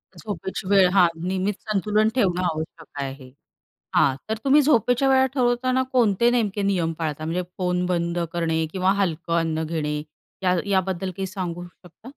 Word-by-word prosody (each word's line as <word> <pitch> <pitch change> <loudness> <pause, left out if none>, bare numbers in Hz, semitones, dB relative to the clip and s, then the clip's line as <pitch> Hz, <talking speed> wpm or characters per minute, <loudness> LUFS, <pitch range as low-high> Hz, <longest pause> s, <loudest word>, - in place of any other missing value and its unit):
झोपेची 190 -1 -6
वेळ 195 -2 +5
हां, 180 -2 +5 0.2
नियमित 190 +2 0
संतुलन 215 0 +1
ठेवणं 185 -7 +2
आवश्यक 160 -1 -4
आहे. 135 -1 -7 0.6
हां. 130 - +4
तर 220 - -1
तुम्ही 285 +2 +5
झोपेच्या 270 -1 +3
वेळा 265 0 +5
ठरवताना 255 0 +1
कोणते 235 -1 +3
नेमके 210 -4 0
नियम 180 -5 0
पाळता? 155 -1 -3
म्हणजे 175 +3 -1
फोन 180 -1 0
बंद 170 -1 -1
करणे 165 -1 0
किंवा 190 0 +1
हलकं 170 -1 -1
अन्न 160 -1 -1
घेणे 150 -2 -2 0.4
या 180 0 +3
याबद्दल 190 -1 0
काही 190 0 -2
सांगू 175 -2 -5
शकता? 180 +4 -21
185 Hz, 155 wpm, -23 LUFS, 165-210 Hz, 0.6 s, वेळ